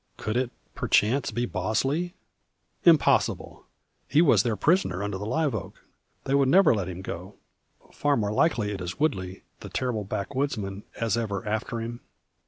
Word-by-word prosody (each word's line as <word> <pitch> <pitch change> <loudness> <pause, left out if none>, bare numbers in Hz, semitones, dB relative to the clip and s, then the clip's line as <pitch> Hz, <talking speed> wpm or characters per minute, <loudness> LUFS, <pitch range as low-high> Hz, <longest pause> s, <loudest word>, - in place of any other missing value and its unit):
Could 110 - -3
it, 125 0 +1 0.2
perchance, 120 +6 +2
be 120 0 -1
Bosley? 135 - -1 0.7
Impossible! 165 -4 +3 0.4
He 145 - +3
was 165 -3 +6
their 115 -3 0
prisoner 100 - +1
under 100 -2 -3
the 105 - -4
live 145 +3 0
oak. 95 -2 -5 0.5
They 135 - -2
would 140 -1 +4
never 190 +1 +6
let 100 -5 -2
him 90 +1 -7
go. 95 +3 -7 0.6
Far 145 -1 +1
more 105 -2 0
like 160 +8 +2
it 105 -4 -2
is 90 0 -5
Woodley 95 -11 -1 0.2
the - - -9
terrible 125 -5 -2
backwoodsman, 105 -2 -3
as 115 0 +1
ever 105 -2 -3
after 110 +2 -2
him? 115 +1 -5
115 Hz, 160 wpm, -26 LUFS, 100-140 Hz, 0.7 s, was